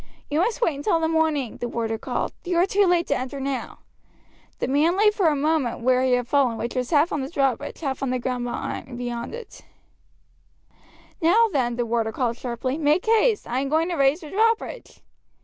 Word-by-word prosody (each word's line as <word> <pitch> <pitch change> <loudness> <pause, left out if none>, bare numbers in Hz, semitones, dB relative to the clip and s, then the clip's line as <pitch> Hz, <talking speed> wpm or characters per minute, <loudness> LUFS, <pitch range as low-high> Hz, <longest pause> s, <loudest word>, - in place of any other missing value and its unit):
"You 300 - +1
must 450 +7 0
wait 335 - +2
until 310 +5 0
the 320 - +1
morning," 315 -6 0
the 240 - -3
warder 225 -2 -3
called; - - -3
"you 350 -1 -1
are 350 - +5
too 400 0 +2
late 350 -1 +3
to 285 - 0
enter 260 +2 -4
now." 270 -1 -4 0.8
The - - -2
man 310 +7 +2
lay 420 +1 +5
for 400 -5 +1
a 305 - +3
moment 290 -5 0
where 255 +1 +3
he 260 -1 +2
had 245 -1 +1
fallen, 260 -4 +2
which 235 +1 -4
was 250 -1 -2
half 305 +2 +3
on 295 - -1
the 265 - -4
drawbridge, 275 -3 -1
half 270 -4 -3
on 270 - -1
the 255 - 0
ground 245 0 -4
beyond 240 -1 -4
it. - - -11 1.6
"Now, 435 +8 +4
then," 240 -4 0
the 240 0 -1
warder 225 -1 0
called 235 0 -1
sharply, 255 +4 -3
"make 305 +3 +2
haste; 450 0 +2
I 245 +2 -1
am 275 0 -2
going 320 +3 +1
to 350 - -1
raise 275 +3 +2
the 305 - -10
drawbridge." 455 +4 -1
280 Hz, 205 wpm, -24 LUFS, 250-335 Hz, 1.6 s, are